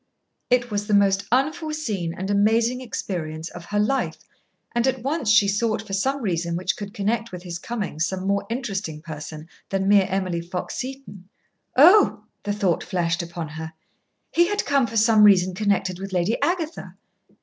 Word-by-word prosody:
It 245 -1 +2
was 205 0 -2
the 210 - +3
most 200 0 +3
unforeseen 280 - -1
and 190 +2 -3
amazing 225 +5 +2
experience 165 -9 -4
of 175 -1 -10
her 205 - -3
life, 240 +6 0 0.5
and 240 +1 +1
at 260 -2 -1
once 280 -3 -1
she 215 -1 +6
sought 215 +2 0
for 200 - -9
some 265 +7 0
reason 170 -3 -1
which 185 +2 -1
could 200 -1 -7
connect 225 +3 -1
with 180 -1 -8
his 175 -2 -6
coming 210 -8 -4
some 185 +3 -1
more 200 0 +1
interesting 200 - -4
person 155 -1 -8 0.2
than 195 0 -1
mere 200 -1 +5
Emily 185 -3 -1
Fox 175 +1 -5
Seton. 255 -8 -7 0.5
Oh, 360 +10 +6 0.2
the 205 - -3
thought 200 -5 0
flashed 175 -1 -1
upon 170 -2 -6
her, 160 +1 -7 0.6
he 345 +1 +4
had 415 +2 -1
come 275 -3 +2
for 225 - -4
some 220 0 +5
reason 185 -3 +5
connected 190 -2 0
with 195 0 -6
Lady 180 +5 +1
Agatha. 340 -2 -2
200 Hz, 170 wpm, -23 LUFS, 180-235 Hz, 0.6 s, she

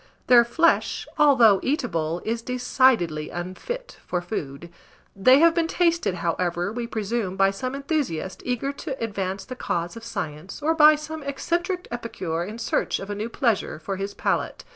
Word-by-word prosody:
Their 245 -1 +7
flesh, 325 +8 +1
although 240 -9 +6
eatable, 175 - -1
is 230 +1 -1
decidedly 245 - +1
unfit 185 - -6
for 180 - 0
food; 170 -3 -6 0.4
they 255 +7 +6
have 335 0 +6
been 335 -1 +1
tasted, 335 - +1
however, 175 +2 -1
we 235 0 -3
presume 220 -3 -2
by 195 0 +4
some 255 +7 -4
enthusiast 275 - -2
eager 250 +3 -2
to 280 -1 -6
advance 195 -4 -3
the 255 - -7
cause 175 -6 -3
of 230 - -9
science, 155 -4 -6
or 310 +2 +1
by 305 -1 +7
some 310 +1 -7
eccentric 345 +6 -2
epicure 185 -9 -3
in 210 +5 -7
search - - 0
of 195 +1 -7
a - - -3
new 215 +3 -4
pleasure 230 - 0
for 190 +5 -5
his 195 +1 -4
palate. - - -1
230 Hz, 165 wpm, -24 LUFS, 185-280 Hz, 0.4 s, Their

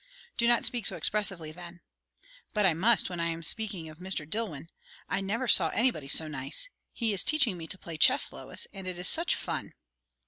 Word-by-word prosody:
"Do 235 - +1
not 240 0 +3
speak 240 -4 +3
so - - +1
expressively, 190 -7 0
then." 175 +1 -11 0.8
"But 210 -1 +2
I 180 - +4
must, 215 +8 +3
when 180 -2 -6
I 170 - 0
am 165 0 -5
speaking 200 -2 0
of 155 +1 -13
Mr. 180 -5 -4
Dillwyn. 165 -6 -4 0.4
I 195 - -2
never 225 +6 -3
saw 170 -7 +5
anybody 225 - 0
so 155 +3 +5
nice. 140 - -1 0.2
He 225 -3 -2
is 190 - +3
teaching 275 -10 +2
me 165 -2 -8
to 185 - -2
play 165 -3 -9
chess, 260 - +4
Lois, - - -3
and 195 -2 -8
it 180 -1 -4
is 180 - -1
such 335 +2 +2
fun." - - -5
185 Hz, 205 wpm, -28 LUFS, 165-225 Hz, 0.8 s, saw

